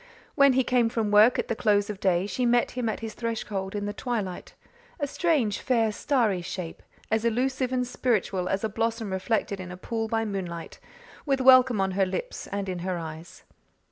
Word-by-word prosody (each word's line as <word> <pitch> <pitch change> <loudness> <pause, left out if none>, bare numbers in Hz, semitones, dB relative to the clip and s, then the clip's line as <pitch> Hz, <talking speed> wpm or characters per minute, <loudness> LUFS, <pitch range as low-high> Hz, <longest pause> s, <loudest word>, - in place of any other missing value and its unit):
When 280 -2 +5
he 260 +1 +3
came 245 -2 +2
from 225 -3 -1
work 215 +4 +6
at - - -1
the 230 - -1
close 205 -3 +2
of 210 -2 -6
day 185 -2 +2
she 205 +5 -2
met 240 0 +3
him 245 -2 -2
at 220 - -4
his 225 -1 -5
threshold 210 -4 -4
in 205 0 -2
the 205 - -3
twilight 215 -8 -4 0.4
a 285 - 0
strange, 285 - 0
fair, 230 -5 +1
starry 220 -6 +1
shape, 175 -1 -6 0.3
as 220 0 +1
elusive 255 +2 0
and 250 -1 0
spiritual 205 -7 -1
as 195 +2 -1
a - - +2
blossom 225 0 -2
reflected 195 +1 -1
in 185 -1 -7
a 180 - -8
pool 225 +3 -3
by 225 0 0
moonlight 180 -5 -5 0.4
with 275 -2 0
welcome 255 -3 +6
on 190 0 +1
her 190 0 +1
lips - - -5
and 200 -1 -4
in 180 -2 -3
her 180 0 -2
eyes. 160 0 -8
220 Hz, 200 wpm, -26 LUFS, 190-245 Hz, 0.4 s, work